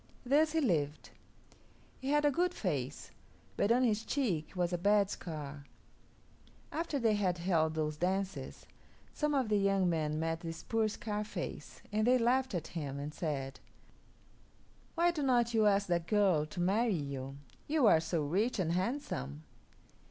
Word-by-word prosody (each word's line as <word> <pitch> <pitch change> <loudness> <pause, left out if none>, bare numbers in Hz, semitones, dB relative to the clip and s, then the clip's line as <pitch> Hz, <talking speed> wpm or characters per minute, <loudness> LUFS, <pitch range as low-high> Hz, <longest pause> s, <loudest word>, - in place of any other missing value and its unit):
Thus 300 +4 +3
he 325 - +2
lived. 155 - 0 0.9
He 265 - -4
had 295 +1 +3
a 290 - +5
good 360 +5 0
face, 145 - -3 0.4
but 205 - +2
on 250 +2 +4
his 220 -3 +1
cheek 215 - -1
was 180 -1 0
a - - +1
bad 205 +1 +3
scar. 145 -4 -6 1.1
After 320 -2 -2
they 230 -4 +2
had 190 -4 +1
held 165 -3 +1
those 155 -1 -1
dances, 190 +3 -2 0.5
some 300 -1 0
of 265 -4 +1
the 210 -1 +2
young 195 -2 +2
men 155 -2 0
met 165 0 -1
this 165 -1 -7
poor 225 -1 +1
Scarface, 210 0 -5
and 215 +2 +1
they 255 +1 +6
laughed 250 -1 +1
at 165 -2 -3
him 145 -5 -4
and 145 +2 -5
said, 140 -5 -3 1.4
"Why 345 +1 +3
do 325 -3 -4
not 240 -3 +2
you 220 -2 +4
ask 200 0 +3
that 170 -1 0
girl 185 -6 +3
to 175 - -8
marry 205 +5 +2
you? 140 -3 -5 0.3
You 300 -3 +2
are 185 -7 +6
so 160 -1 -1
rich 200 +13 0
and 175 -4 0
handsome." 180 - -2
195 Hz, 160 wpm, -33 LUFS, 160-235 Hz, 1.4 s, they